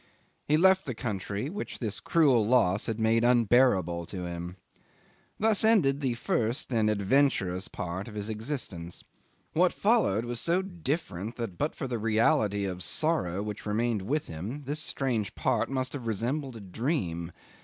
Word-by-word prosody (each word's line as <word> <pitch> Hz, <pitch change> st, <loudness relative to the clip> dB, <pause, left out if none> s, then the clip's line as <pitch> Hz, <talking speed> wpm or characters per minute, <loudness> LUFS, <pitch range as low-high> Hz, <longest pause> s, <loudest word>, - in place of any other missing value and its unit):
He 150 Hz, -, +4 dB
left 190 Hz, 0 st, +4 dB
the 130 Hz, -, -3 dB
country, 105 Hz, 0 st, -3 dB
which 205 Hz, +3 st, -5 dB
this 105 Hz, -4 st, -3 dB
cruel 140 Hz, -9 st, +3 dB
loss 105 Hz, -4 st, +2 dB
had 115 Hz, 0 st, -2 dB
made 115 Hz, +1 st, +3 dB
unbearable 115 Hz, -8 st, +3 dB
to 90 Hz, -3 st, -5 dB
him. 85 Hz, +1 st, -6 dB, 0.8 s
Thus 220 Hz, -1 st, +4 dB
ended 170 Hz, -11 st, +4 dB
the 130 Hz, -4 st, 0 dB
first 120 Hz, +3 st, -1 dB
and 110 Hz, -2 st, +2 dB
adventurous 100 Hz, -4 st, +1 dB
part 90 Hz, +4 st, -5 dB
of 110 Hz, -, -9 dB
his 105 Hz, 0 st, -3 dB
existence. 110 Hz, -, -4 dB, 0.5 s
What -, -, +4 dB
followed 105 Hz, +4 st, +2 dB
was 120 Hz, -1 st, -4 dB
so 175 Hz, +7 st, +1 dB
different 145 Hz, -, -3 dB
that, 115 Hz, -7 st, -4 dB
but 150 Hz, -, -1 dB
for 135 Hz, -, -4 dB
the 120 Hz, -2 st, -3 dB
reality 110 Hz, -2 st, +2 dB
of 90 Hz, -1 st, -4 dB
sorrow 100 Hz, -, 0 dB
which 105 Hz, 0 st, -6 dB
remained 110 Hz, 0 st, 0 dB
with 145 Hz, +10 st, -1 dB
him, 105 Hz, -, -6 dB
this 145 Hz, +3 st, -2 dB
strange 120 Hz, -9 st, -1 dB
part 125 Hz, -4 st, 0 dB
must 130 Hz, -1 st, -2 dB
have 130 Hz, -5 st, -5 dB
resembled 125 Hz, +5 st, -2 dB
a 110 Hz, -, -8 dB
dream. 90 Hz, -, -2 dB
115 Hz, 160 wpm, -28 LUFS, 100-135 Hz, 0.8 s, He